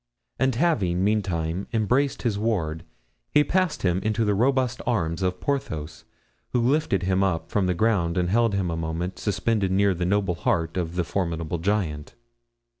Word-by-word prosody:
And 130 -2 +2
having, 105 - +1
meantime, 95 -4 -1
embraced 125 +5 +1
his 115 -5 +1
ward, 85 -8 -1 0.5
he 150 - +4
passed 180 -2 0
him 90 -1 +2
into 110 +3 0
the 105 - +2
robust 125 +3 +1
arms 85 -7 0
of 90 -1 -1
Porthos, 80 - -3 0.5
who 125 - +3
lifted 125 - +1
him 95 +1 +2
up 90 -4 -1
from 100 -3 +1
the 90 - +1
ground 90 -4 +1
and 90 -1 +1
held 115 +2 +2
him 95 -3 0
a - - -2
moment 80 +3 -3
suspended 105 -1 0
near 100 +1 +3
the 90 0 -2
noble 100 -1 +1
heart 85 0 -1
of 85 -2 -2
the 90 - +1
formidable 85 -2 -2
giant. 85 -6 -2
95 Hz, 170 wpm, -25 LUFS, 85-115 Hz, 0.5 s, he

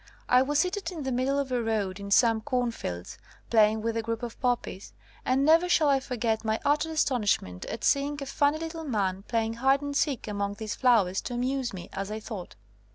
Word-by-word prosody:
I 250 0 +5
was 290 +2 0
seated 365 +2 0
in 325 -5 -6
the 265 - -2
middle 260 +3 0
of 275 -2 -2
a 245 -1 +1
road 210 -4 -1
in 200 0 -7
some 225 +1 +4
cornfields, 235 - -3 0.3
playing 220 -1 +4
with 230 0 -1
a 230 - 0
group 230 +1 -4
of 235 -1 -6
poppies, 245 -6 -2 0.3
and 265 +2 +2
never 330 +3 +5
shall 310 -4 +4
I 275 -1 +4
forget 235 -4 -2
my 220 0 0
utter 300 +2 +2
astonish 255 -9 +2
ment 90 0 -9
at - - -6
seeing 285 +1 +2
a 275 - -5
funny 285 +2 +1
little 325 0 -5
man 195 -9 -1
playing 225 -1 0
hide 270 +2 +3
and 285 0 -4
seek 280 -6 0
among 200 -1 -2
these 215 0 -4
flowers 215 -8 +3
to 245 - -5
amuse 255 +1 -1
me, 180 -2 -8
as 195 +1 -4
I 215 +1 -4
thought. 210 -4 -8
245 Hz, 215 wpm, -28 LUFS, 215-280 Hz, 0.3 s, I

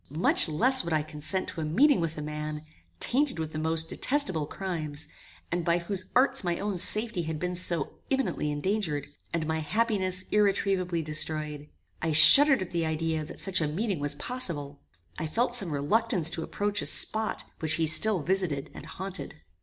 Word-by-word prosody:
Much 170 - +2
less 255 - +3
would 170 - -4
I 155 -1 0
consent 155 +5 -3
to 165 - -7
a - - -3
meeting 255 - +2
with 165 -2 -4
a 150 - -5
man, 150 0 -6 0.3
tainted 275 -1 +1
with 160 -1 -5
the 155 - -5
most 160 +1 -1
detestable 190 - -1
crimes, 160 -5 -3 0.4
and 175 0 -2
by 170 +1 +1
whose 185 +2 -2
arts 265 -1 +3
my 175 -1 -2
own 200 -3 -4
safety 215 0 +3
had 160 -1 -5
been 180 +3 -4
so 170 -4 +2
imminently 270 - -2
endangered, 150 -1 -2 0.3
and 165 -2 -2
my 160 0 -2
happiness 190 0 -1
irretrievably 195 -4 0
destroyed. 150 -1 -3 0.3
I 160 -1 -1
shuddered 270 - +9
at 185 - -11
the 170 -1 -2
idea 160 0 -2
that 150 - -9
such 185 -3 0
a 155 - 0
meeting 190 +3 -3
was 145 0 -1
possible. 150 - -5 0.4
I 160 - -3
felt 240 +9 -1
some 200 -8 +4
reluctance 165 - 0
to 165 - -4
approach 205 +4 -3
a - - +2
spot 220 0 +2 0.2
which 160 -1 +2
he 165 - 0
still 180 +2 +2
visited 175 -7 -1
and - - -11
haunted. 190 0 -7
170 Hz, 180 wpm, -27 LUFS, 155-205 Hz, 0.4 s, shuddered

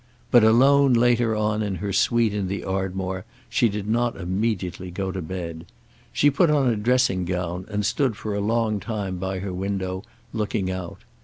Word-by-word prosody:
But, 120 -2 +7
alone 135 +4 +5
later 120 -1 +3
on 105 0 0
in 100 -2 -2
her 100 +3 -3
suite 115 +1 +2
in 100 -2 -1
the 100 +2 -3
Ardmore 95 -1 -3 0.3
she 120 - +3
did 105 0 -4
not 120 +2 +1
immediately 95 -1 -2
go 95 +2 -3
to 95 0 -4
bed. 85 -1 -6 0.4
She 145 - +3
put 165 +4 +3
on 145 -3 +3
a 120 - +2
dressing 115 -3 +2
gown 90 0 -3
and 105 -1 -1
stood 115 +2 +1
for 105 0 -4
a 100 - -1
long 110 0 +1
time 100 -4 -4
by 95 +1 -3
her 95 -2 -4
window, 95 0 -3 0.3
looking 105 -3 -1
out. 95 -2 -6
100 Hz, 180 wpm, -24 LUFS, 95-115 Hz, 0.4 s, But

